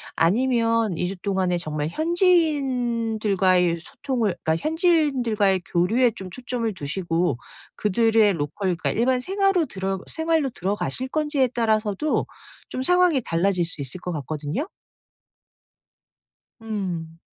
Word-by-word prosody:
아니면 230 +1 +2
2 180 - -1
주 195 +1 -5
동안에 185 -2 0
정말 155 -3 -3
현지인들과의 240 - +2
소통을 235 -8 -2
그러니까 160 - +2
현지인들과의 270 - +2
교류에 225 +8 +3
좀 190 -3 -7
초점을 245 +1 -3
두시고 165 -2 -1 0.4
그들의 220 +1 +3
로컬 175 +4 -2
그러니까 175 - -2
일반 250 +3 +2
생화로 390 +1 +1
들어 190 -5 -3
생활로 320 -3 0
들어가실 200 - -2
건지에 295 -3 +1
따라서도 220 +2 0 0.4
좀 255 - -4
상황이 360 -2 +4
달라질 175 +1 +1
수 165 -3 -7
있을 140 +6 -4
것 180 - -5
같거든요? 155 - -3 1.9
음. 180 -7 -5
215 Hz, 290 characters per minute, -24 LUFS, 180-260 Hz, 1.9 s, 상황이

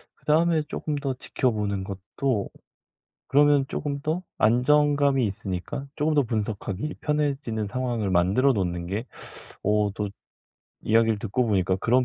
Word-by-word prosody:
그다음에 160 +1 +2
쪼금 150 0 -4
더 140 -2 -2
지켜보는 105 -7 -1
것도 100 +4 -2 0.8
그러면 145 0 +5
쪼금 140 -1 -3
더 160 +5 -1 0.2
안정감이 140 +3 +3
있으니까 95 +7 -4
쪼금 155 +1 +1
더 145 - +4
분석하기 110 +2 -3
편해지는 140 -8 -1
상황을 120 -3 -2
만들어 95 +10 +3
놓는 90 -3 -2
게 100 +6 -3 0.6
어 105 0 +2
또 105 -1 -2 0.7
이야기를 115 -1 +3
듣고 115 +4 0
보니까 95 -3 +2
그런 125 +6 +2
120 Hz, 300 characters per minute, -25 LUFS, 100-145 Hz, 0.8 s, 그러면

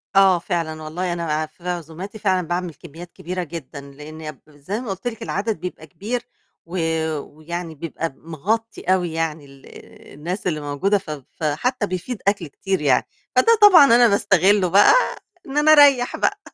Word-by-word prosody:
آه، 190 -3 +6
فعلًا، 165 -3 -3
والله 175 +3 -3
أنا 155 -2 -1
في 170 +3 -9
عزوماتي 175 +5 -6
فعلًا 185 -4 0
باعمل 175 -1 -2
كميات 170 +3 -12
كبيرة 180 +1 -4
جدًا، 155 -3 -8
لإن 150 +1 -10
زَي 155 +9 -6
ما 240 - -7
قُلت 190 +5 -4
لِك 230 -1 -5
العدد 205 -1 -2
بيبقى 175 -3 -7
كبير، 230 - -4 0.4
و 180 +2 -6 0.4
ويعني 160 +3 -7
بيبقى 165 -1 -5
مغطي 205 +9 -3
أوي، 175 -3 -1
يعني 160 -2 -2
ال 135 -1 -17 0.5
الناس 175 +7 -5
اللي 155 -3 -1
موجودة، 145 +8 0
ف 190 -5 -10 0.3
فحتى 205 - -1
بيفيض 185 +6 -4
أكل 200 -5 +1
كتير 190 +5 -3
يعني، 135 -4 +3 0.3
فده 460 -1 +5
طبعًا 360 -8 +9
أنا 240 -1 +6
باستغله 195 -1 +3
بقى 200 - +6 0.5
إن 275 +2 -5
أنا 305 +1 +5
أريّح 280 -5 +6
بقى. - - 0
175 Hz, 160 wpm, -21 LUFS, 155-205 Hz, 0.5 s, طبعًا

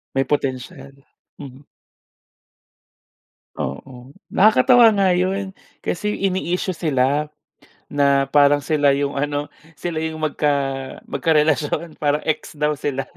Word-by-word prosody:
May 135 - +2
potential. 135 +1 -3 0.5
Mhm. 135 -1 -11 1.9
Oo. 125 - -7 0.2
Nakakatawa 230 +3 +5
nga 200 -2 +2
'yon, 190 +2 -2 0.2
kasi 210 +4 -2 0.2
ini-issue 185 0 -2
sila. 150 -1 0 0.6
Na 140 -1 +3
parang 145 0 +4
sila 145 -1 +2
'yong 140 0 -2
ano, 145 +1 -2 0.2
sila 160 +2 -4
'yong 160 0 -3
magka 150 -1 0 0.6
magka-relasyon. 155 0 0
Parang 150 0 0
ex 155 - -3
daw 150 0 0
sila. 135 -2 -2
150 Hz, 105 wpm, -21 LUFS, 140-170 Hz, 1.9 s, Nakakatawa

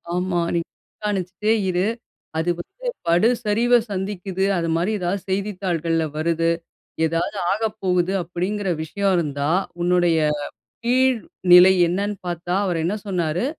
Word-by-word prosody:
ஆமா. 180 -1 0
நீ - - +3 0.4
கண்காணிச்சிட்டே 205 +1 0 0.2
இரு. 180 +3 +1 0.5
அது 170 +2 0
வந்து - - -8 0.2
படு 175 +7 +4 0.2
சரிவ 230 +4 +2 0.2
சந்திக்குது 190 -1 -2
அதுமாரி 165 +4 0
எதாவது 180 +2 -1
செய்தித்தாள்கள்ல 180 -5 -1
வருது. 165 +1 +1 0.5
எதாவது 165 +5 -1
ஆகப்போகுது 195 -4 0
அப்பிடிங்கிற 185 +4 -3
விஷயம் 195 +4 0
இருந்தா, 145 -2 -1 0.3
உன்னுடைய 175 -2 +3 0.7
கீழ்நிலை 220 -8 +5 0.2
என்னன்னு 200 +3 -1
பாத்தா, 175 +1 -3
அவரு 175 -3 0
என்ன 205 +4 0
சொன்னாரு, 175 +1 -1
180 Hz, 110 wpm, -22 LUFS, 170-205 Hz, 0.7 s, கீழ்நிலை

